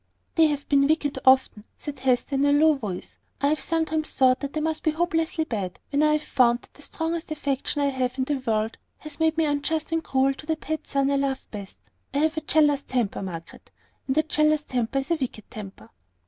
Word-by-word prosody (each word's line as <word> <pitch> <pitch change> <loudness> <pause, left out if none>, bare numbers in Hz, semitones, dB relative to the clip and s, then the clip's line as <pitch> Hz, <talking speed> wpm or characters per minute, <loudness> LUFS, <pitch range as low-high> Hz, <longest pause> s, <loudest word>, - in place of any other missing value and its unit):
"They 325 -1 +5
have 290 -1 -3
been 275 -1 +4
wicked, 290 -3 0
often," 260 -5 +4
said 290 -3 -7
Hester, 255 +2 +1
in 275 +1 +2
a 285 - +4
low 310 +2 +5
voice. 210 -10 -6 0.2
"I 280 - +2
have 300 -2 0
sometimes 320 -1 0
thought 255 -1 +4
that 280 +1 -4
I - - +2
must 315 0 -1
be 315 - +1
hopelessly 325 0 0
bad, 200 - -4
when 285 +1 +2
I 305 0 +4
have 305 0 0
found 240 -4 +2
that - - -20
the - - -15
strongest 325 +2 -3
affection 285 -1 -1
I 280 - +3
have 255 -1 -2
in 260 - +1
the 285 +2 -1
world 220 -3 -1 0.2
has 305 0 -8
made 320 0 +2
me 325 - +3
unjust 300 +2 -1
and 325 0 0
cruel 270 +1 +2
to 300 +3 -12
the 320 - +1
person 280 -3 -1
I 280 - +2
love 275 -1 -1
best. 200 -3 -8 0.4
I - - +2
have 315 +2 +2
a 315 - -2
jealous 295 -2 +3
temper, 245 -8 -2
Margaret; 170 -4 -8 0.4
and 265 +2 0
a 310 - +5
jealous 305 -1 +2
temper 245 -2 -2
is 270 +4 -2
a 335 - +3
wicked 245 -7 -5
temper." 195 - -10
285 Hz, 220 wpm, -25 LUFS, 260-310 Hz, 0.4 s, They